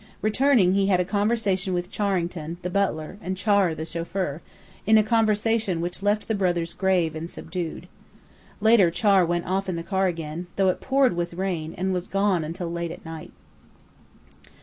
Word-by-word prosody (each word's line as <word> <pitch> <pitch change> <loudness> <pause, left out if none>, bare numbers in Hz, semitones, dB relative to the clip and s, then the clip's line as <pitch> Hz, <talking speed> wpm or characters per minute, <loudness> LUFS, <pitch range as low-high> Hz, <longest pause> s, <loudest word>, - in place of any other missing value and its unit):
Returning, 215 -4 +3
he 195 0 +2
had 185 -2 +3
a 180 - +1
conversation 200 -2 0
with 175 0 -3
Charrington, 175 -5 -2
the 180 - -3
butler, 190 -2 -1
and 185 +1 -4
Char, 200 -4 +2
the 160 +1 -5
chauffeur, 170 -1 -3 0.5
a 220 0 +6
conversation 215 -3 +1
which 175 +2 -3
left 205 +1 0
the 220 - 0
brothers 175 -4 0
grave 180 -5 +1
and 160 +2 -5
subdued. 175 0 -6 0.7
Later 220 -5 +5
Char 195 +1 +3
went 175 0 -1
off 190 +1 -1
in 180 - -1
the 165 - -4
car 190 +1 +1
again, 165 0 -4
though 195 -1 +3
it 185 - -2
poured 265 -6 +2
with 170 0 -3
rain, 170 -4 -3
and 190 +1 -1
was 180 -1 -3
gone 195 -4 +1
until 170 +2 -5
late 170 0 -3
at 165 - -10
night. 160 -1 -8
185 Hz, 170 wpm, -25 LUFS, 170-200 Hz, 0.7 s, a